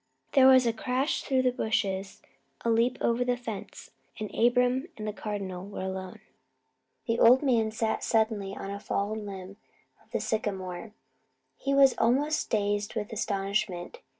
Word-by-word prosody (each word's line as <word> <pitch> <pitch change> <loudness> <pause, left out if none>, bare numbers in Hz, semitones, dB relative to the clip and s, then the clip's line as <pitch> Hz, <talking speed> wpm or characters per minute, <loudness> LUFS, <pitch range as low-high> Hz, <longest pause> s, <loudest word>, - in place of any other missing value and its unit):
There 265 -2 +6
was 260 -1 +7
a 230 - +2
crash 255 +5 -1
through 260 -2 +1
the 255 - +3
bushes, 200 -5 -2 0.4
a 230 - +3
leap 235 +3 +2
over 235 +1 +2
the 245 0 0
fence, 225 -5 -8 0.3
and 215 -1 -5
Abram 250 +4 +2
and 215 0 -5
the 210 - -2
Cardinal 195 -3 -5
were 200 -2 -6
alone. 190 -1 -5 0.8
The 230 -1 0
old 250 +5 +7
man 235 -5 +2
sat 220 0 -1
down - - -17
suddenly 220 -3 0
on 195 - -6
a 200 - -5
fallen 210 +1 -2
limb 195 0 -8 0.5
of - - -31
the - - -2
sycamore. 195 -2 -3 0.6
He 275 0 -1
was 275 -1 +6
almost 290 +6 +2
dazed 205 0 0
with 210 -1 -3
astonishment. 195 -4 -2
220 Hz, 160 wpm, -28 LUFS, 200-245 Hz, 0.8 s, was